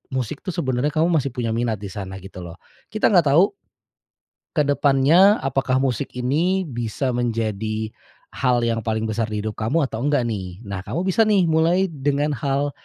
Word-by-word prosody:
musik 130 +3 -3
tuh 185 - -3
sebenarnya 135 -3 0
kamu 160 +2 +3
masih 140 - -2
punya 120 -2 -2
minat 115 -1 0
di 100 - -6
sana 95 -1 -6
gitu 95 -1 -10
loh. 85 0 -9 0.4
Kita 215 -1 +2
nggak 170 -7 +4
tahu, 185 +4 +5 1.0
ke 150 - +3
depannya, 145 +8 +5
apakah 135 -1 0
musik 130 +1 -2
ini 160 +10 +1
bisa 120 +1 -2
menjadi 110 -2 -2 0.4
hal 125 -2 +1
yang 115 -1 0
paling 110 0 -1
besar 110 0 -1
di 105 0 -3
hidup 110 -1 -4
kamu 140 +9 +1
atau 110 - -6
enggak 145 -3 +2
nih. 95 -4 -5
Nah, 100 -3 -5
kamu 170 - -3
bisa 225 +4 +4
nih 200 -4 +4
mulai 165 +4 +3
dengan 145 0 0
hal 140 +3 -1
130 Hz, 175 wpm, -22 LUFS, 110-150 Hz, 1.0 s, tahu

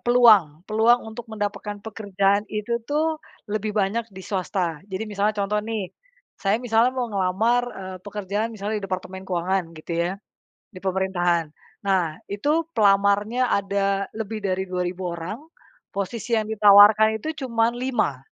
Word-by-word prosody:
peluang 215 -11 +5
peluang 225 +3 +4
untuk 220 +1 -8
mendapatkan 205 -1 -4
pekerjaan 200 -1 0
itu 215 +3 -2
tuh, 310 +2 0 0.3
lebih 215 0 -2
banyak 215 +3 0
di 190 - -9
swasta. 180 -4 -2
Jadi 190 0 -4
misalnya 205 +1 0
contoh 210 +1 0
nih, 215 -4 -4 0.5
saya 195 +1 +2
misalnya 235 0 +3
mau 245 -3 -1
ngelamar, 200 +6 +2 0.2
eee, 185 -1 -6
pekerjaan 205 +2 -3
misalnya 210 +1 -3
di - - -7
departemen 190 0 -5
keuangan 185 +1 0
gitu 155 +2 -7 0.2
ya, - - -2 0.6
di 185 - -10
pemerintahan. 185 -3 +1 0.4
Nah, 180 -5 +1
itu 295 +11 +1
pelamarnya 205 +3 +3
ada 200 0 0
lebih 220 0 -4
dari 190 -2 -1
2.000 180 0 -2
orang, 170 +5 -5 0.6
posisi 220 +4 -4
yang 215 - -2
ditawarkan 215 +1 +7
itu - - -5 0.2
cuma 230 -2 +2
5. 240 - -1
205 Hz, 140 wpm, -24 LUFS, 190-220 Hz, 0.6 s, ditawarkan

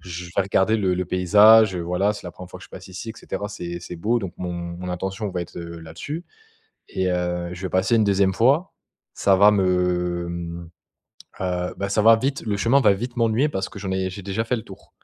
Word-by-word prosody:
Je 90 -1 -7
vais 100 - +4
regarder 100 +3 +2
le 95 -3 +1
le 90 0 -1
paysage, 105 +3 +6
heu, - - -3
voilà, 90 +4 0
c'est 105 - -10
la 90 - -5
1re 90 0 -11
fois - - -9
que - - -11
je - - -16
passe - - -11
ici 95 +5 -8
et - - -6
cetera. 105 -1 -5
C'est 85 -4 -6
c'est 90 - -8
beau 115 +8 +1
donc 95 -5 -6
mon 90 -1 -4
mon 85 +1 -6
attention 95 +3 -3
va 90 -1 -3
être, - - -12
heu, 85 -1 -8
là-dessus 85 - -7 0.7
et 95 -1 -1
heu, 90 -1 -2
je 90 - -9
vais 95 - -2
passer 95 +6 +2
une 110 - +4
2e 95 -1 +2
fois, 140 - +2 0.4
ça 100 -1 +3
va 105 +2 +7
me, 90 -2 +1
mmh, 85 -1 -6 0.7
heu, 90 -1 -2
bah, 100 - -2
ça 105 +2 +1
va 115 +1 +7
vite 135 +4 -2
le 100 -1 0
chemin 120 +7 +3
va 105 -5 +5
vite 120 +5 -6
m'ennuyer 115 +5 +2
parce 95 -8 -3
que 105 - -11
j'en 95 -1 -4
ai 95 0 -1
j'ai 100 +1 -8
déjà 100 +3 -2
fait 120 +2 0
le 110 - -5
tour - - -14
95 Hz, 240 wpm, -23 LUFS, 90-110 Hz, 0.7 s, va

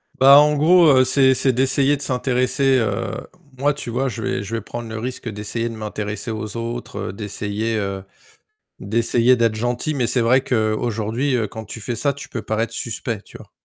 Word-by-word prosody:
Bah, 135 +2 +8
en 150 0 +4
gros, 170 +2 +5
heu, 130 - +5
c'est 130 0 +4
c'est 130 0 +2
d'essayer 135 +3 +2
de 140 - -9
s'intéresser, 130 +1 +1
heu 110 - -1 0.5
moi, 145 +1 +2
tu 140 -4 -6
vois, 135 +3 0
je 115 -2 -5
vais 100 - -2
je 115 +4 -5
vais 115 - -3
prendre 115 +1 -7
le 110 - -5
risque 125 0 -5
d'essayer 110 +3 -3
de 115 - -7
m'intéresser 105 +1 -4
aux 110 +1 -5
autres, 120 +1 -5
heu, - - -6
d'essayer, 105 +2 -3
heu, 100 -2 -3 0.8
d'essayer 115 +4 +2
d'être 115 -2 +2
gentil 120 +6 -1
mais, 125 -4 0
c'est 125 +1 +1
vrai 130 +3 +4
qu'aujourd'hui, 115 +3 -1
heu, 110 -3 0
quand 110 +2 -8
tu 110 +2 -8
fais 120 +2 -4
ça, 140 +5 +1
tu 140 - -10
peux 115 - -5
paraître 110 +2 -2
suspect, 115 -2 -3
tu - - -13
vois? - - -15
120 Hz, 200 wpm, -21 LUFS, 110-130 Hz, 0.8 s, Bah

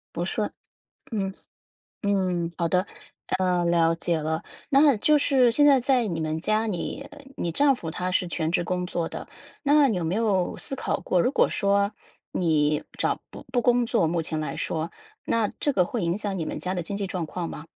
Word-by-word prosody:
不 - - -1
顺， - - -2 0.6
嗯， 195 -3 -2 0.7
嗯， 185 -4 0
好 170 -1 0
的， 180 +3 +1 0.5
呃， 180 -2 +1
了 170 -1 +3
解 170 -1 0
了。 160 +1 -2 0.3
那 280 -2 +6
就 300 +8 +4
是 260 -4 +4
现 290 +5 +4
在 275 -2 +6
在 250 -2 +2
你 165 -4 -2
们 155 0 -2
家 215 +5 +1
里， 250 +9 -4 0.3
你 170 - -2
丈 280 - +4
夫 165 -10 -6
他 180 +3 -3
是 180 - +1
全 160 -2 -1
职 175 - +2
工 180 +1 -2
作 170 -2 -2
的， - - -7 0.4
那 290 0 +5
有 180 -8 -1
没 165 +3 -1
有 200 -5 +1
思 270 - -4
考 - - -1
过， 180 - +1
如 250 - +2
果 - - +4
说 200 0 +1 0.4
你 150 -4 +1
找 - - 0
不 - - -11
不 245 - +3
工 245 0 +3
作 230 -8 +2
目 165 +1 0
前 160 0 -2
来 150 -3 -3
说， 160 +1 -3 0.3
那 225 -2 +1
这 290 - +1
个 185 -8 +3
会 225 +4 -3
影 170 +2 0
响 205 -2 -3
你 160 - -2
们 - - -4
家 185 +1 -2
的 175 - -2
经 200 +5 -4
济 200 -1 -2
状 180 -3 -3
况 170 +1 -4
吗？ 155 - -8
185 Hz, 220 characters per minute, -25 LUFS, 170-230 Hz, 0.7 s, 那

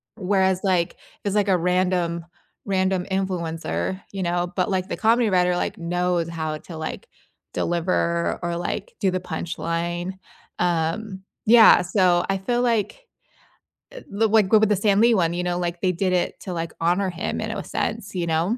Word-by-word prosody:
Whereas 190 -2 +1
like, 180 -4 +1 0.3
it's 200 0 0
like 205 -1 +2
a 185 - +4
random 180 -1 0 0.4
random 190 -2 0
influencer, 170 - -2
you 195 -2 -4
know, 175 +1 -1
but 185 - 0
like 190 -1 -1
the - - -4
comedy 230 0 +3
writer 180 -1 +2
like, - - -2
knows 175 0 -1
how 155 -2 -3
to 165 - -10
like, 160 0 -6 0.5
deliver 170 0 0
or 170 0 -1
like, 480 - -4
do 190 -3 +2
the 185 - -1
punchline. 170 +1 -3 0.5
Um 180 +4 -1 0.2
yeah, 225 -3 +8
so 180 -1 +2
I 195 - +1
feel 240 +6 -1
like, 235 - -1 0.9
uh - - -8 0.3
like 215 -3 +3
go 215 - +6
with 220 - +4
the 210 - +3
Stan 200 +1 +2
Lee 235 0 +5
one, 170 -3 +1
you 180 0 -2
know, 175 0 -1
like 175 -1 -3
they 185 - +2
did 185 +2 0
it 180 - -1
to 190 - -6
like 165 -1 -4
honor 180 +3 +2
him 175 - -3
in - - -3
a - - -4
sense, 210 -3 -3
you 170 -2 -1
know? 165 +8 +1
180 Hz, 180 wpm, -23 LUFS, 170-195 Hz, 0.9 s, yeah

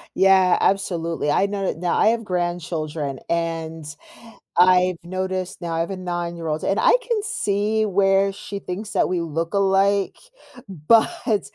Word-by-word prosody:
Yeah, 190 -1 +4
absolutely, 170 -6 0
I 195 - +3
know 200 -1 -3
that - - -2
now, 175 +1 -1
I - - +4
have 230 0 +1
grandchildren, 165 -6 -3
and 165 -1 -3 0.7
I've 180 0 +5
noticed 185 +1 -4
now 170 -1 -4
I 165 - -1
have 170 - -3
a 195 - -4
nine-year-old, 170 -3 -4
and 195 - 0
I - - +5
can 460 -3 0
see 215 - 0
where 195 0 +2
she 200 +1 -7
thinks 200 +3 -6
that 200 - +1
we 180 -1 0
look 165 +2 -3
alike, 195 0 +2 0.5
but, 220 - +1
185 Hz, 150 wpm, -22 LUFS, 170-200 Hz, 0.7 s, I've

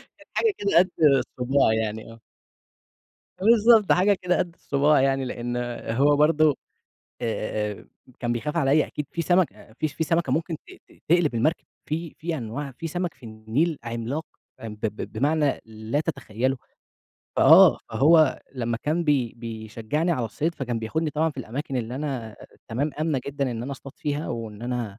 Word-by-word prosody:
كانت - - -20
حاجة 445 -3 +2
كده 200 -3 +1
قد 185 +1 +3
الصباع 135 -3 +3
يعني، 110 0 -3
آه. 115 - -14 1.2
فبالضبط. 220 +1 +5
حاجة 195 +3 +5
كده 180 -1 +1
قد 175 -2 -1
الصباع 145 +1 +2
يعني 135 0 +1
لإن 120 -1 -4 0.4
هو 145 +3 +4
برضه، 150 0 +4 0.7
آآ، 110 -2 -2
آآ - - -16 0.3
كان 120 -1 0
بيخاف 150 +7 -3
عليّا 150 0 +3
أكيد 150 - -5
في 170 - -2
سَمَك 175 0 +3
أأ - - -17
فيش 155 +2 -3
في 160 - -1
سَمَكة 170 +2 +1
ممكن 160 0 -1
ت - - -34 0.3
ت - - -20 0.2
تقلب 165 -5 +3
المركب، 155 +9 +1 0.2
في 160 +1 -3
في 165 0 -3
أنواع 135 +3 -5
في 165 - -4
سَمَك 175 +1 -3
في 130 - -30
النيل 115 +9 -1
عملاق 120 +7 -3 0.4
أ 115 - -6
ب 105 0 -5
بمعنى 145 +4 +1
لا 110 +5 -3
تتخيّله، 130 -4 -2 0.8
فآه. - - +8
فهو 155 +1 +4
لمّا 120 -2 -1
كان 160 +3 0
بي 135 -7 +1
بيشجّعني 115 +7 -3
على 125 -6 -1
الصيد 160 +8 -2
فكان 125 -5 -3
بياخدني 155 +8 -2
طبعًا 155 +2 +1
في - - -17
الأماكن 130 +3 -4
اللي 120 0 -3
أنا 130 -6 -4 0.3
تمام، 135 +7 -1
آمنة 155 -4 0
جدًا 140 -2 -2
إن 115 -1 -4
أنا 140 +3 -4
أصطاد 135 0 -10
فيها 150 -1 -3
وإن 110 -2 -6
أنا 120 -4 -3
140 Hz, 170 wpm, -25 LUFS, 115-160 Hz, 1.2 s, فآه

